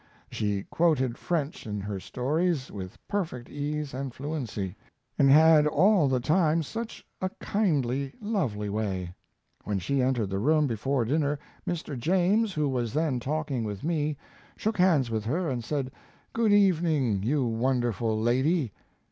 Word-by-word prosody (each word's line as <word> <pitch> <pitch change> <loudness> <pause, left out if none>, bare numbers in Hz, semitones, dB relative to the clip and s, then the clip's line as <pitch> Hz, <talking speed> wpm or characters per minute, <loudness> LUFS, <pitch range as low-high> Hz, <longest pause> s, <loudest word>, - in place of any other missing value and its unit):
She 100 -2 -1
quoted 140 -8 +1
French 165 - -3
in 105 -1 -3
her 100 -1 -4
stories 145 - -1
with 95 -2 -7
perfect 160 -12 -3
ease 145 0 -3
and 135 0 -4
fluency, 125 - -4 0.4
and 135 - +6
had 155 +1 +7
all 180 +2 +4
the 130 -1 +1
time 160 +3 +2
such 225 +8 -6 0.2
a 185 - 0
kindly, 140 - 0
lovely 180 - -1
way. 95 -4 -2 0.5
When 105 -1 -1
she 130 +9 0
entered 125 -6 0
the 95 - -1
room, 150 +6 +3
before 130 +1 0
dinner, 145 +3 +1 0.3
Mr. 160 -4 -3
James, 190 - +2
who 150 -3 0
was 120 -4 -1
then 150 -4 +1
talking 140 -1 -2
with 105 -3 -5
me, 150 -2 0 0.4
shook 215 -2 -2
hands 155 -10 +4
with 110 -1 -2
her 165 +9 0
and 120 -2 -3
said, 135 0 -2 0.4
"Good 230 -2 +2
evening, 160 - +3
you 130 +5 +1
wonderful 115 -2 0
lady." 130 - +1
140 Hz, 150 wpm, -28 LUFS, 115-160 Hz, 0.5 s, had